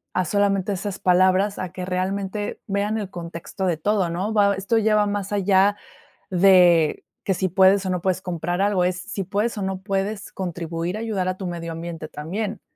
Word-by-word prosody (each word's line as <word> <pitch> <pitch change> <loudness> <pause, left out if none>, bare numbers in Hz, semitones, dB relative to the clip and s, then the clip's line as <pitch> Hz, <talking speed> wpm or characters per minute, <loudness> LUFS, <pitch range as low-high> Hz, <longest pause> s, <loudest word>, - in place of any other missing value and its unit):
a 185 0 +1
solamente 200 +1 +1
esas 195 +1 -4
palabras, 185 +2 +3
a 180 -1 -4
que 180 -1 -5
realmente 195 +2 -3
vean 205 +2 0
el 200 -2 -5
contexto 170 +1 -6
de 175 -3 +1
todo, 200 0 +1
¿no?, 190 +6 -2
va 200 -1 +4
esto 200 +4 0
lleva 215 -1 +3
más 205 -1 -3
allá 200 0 +3 0.6
de 175 -4 +5 0.2
que 195 - +2
si 185 0 0
puedes 190 +2 +4
o - - -1
no 180 -1 -1
puedes 185 0 0
comprar 175 0 -2
algo, 200 -3 +2
es 180 0 -1
si 200 -1 -4
puedes 210 +4 -1
o - - -3
no 190 0 -2
puedes 195 +1 -3
contribuir 175 0 -4
a - - -5
ayudar 205 -5 -1
a 185 0 -2
tu 190 - -6
medio 170 -1 -5
ambiente 165 -1 -6
también. 195 +7 -4
190 Hz, 195 wpm, -23 LUFS, 180-200 Hz, 0.6 s, de